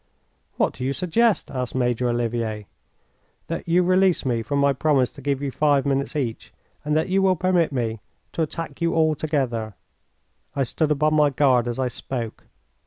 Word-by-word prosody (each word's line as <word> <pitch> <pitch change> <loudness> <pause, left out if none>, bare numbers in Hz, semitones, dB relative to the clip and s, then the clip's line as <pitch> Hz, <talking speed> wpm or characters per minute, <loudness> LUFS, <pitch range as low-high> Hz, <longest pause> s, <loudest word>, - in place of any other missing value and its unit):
"What - - +1
do 125 - -7
you 135 +2 0
suggest?" 190 +4 +1
asked 125 -3 -4
Major 125 -1 +1
Olivier. 115 -3 -2 0.8
"That - - -5
you 175 +2 +3
release 185 -1 +3
me 120 -3 0
from 130 +6 -2
my 140 0 +3
promise 135 -2 +2
to 140 - -13
give 140 0 -1
you 140 - -2
five 145 +1 +2
minutes 140 +2 -1
each, 125 -7 -3 0.3
and 150 +1 +1
that 160 - 0
you 195 +1 +2
will 190 -1 +3
permit 180 -2 +1
me 115 -4 -2 0.3
to - - -3
attack 165 +2 -4
you 170 0 +1
all 160 -1 +3
together." 130 - -2 0.8
I 140 - +1
stood 150 +5 -1
upon 150 +1 +2
my 150 -1 +4
guard 130 -3 +3
as 120 - -3
I 130 -1 0
spoke. 120 -2 -6
140 Hz, 180 wpm, -23 LUFS, 125-160 Hz, 0.8 s, my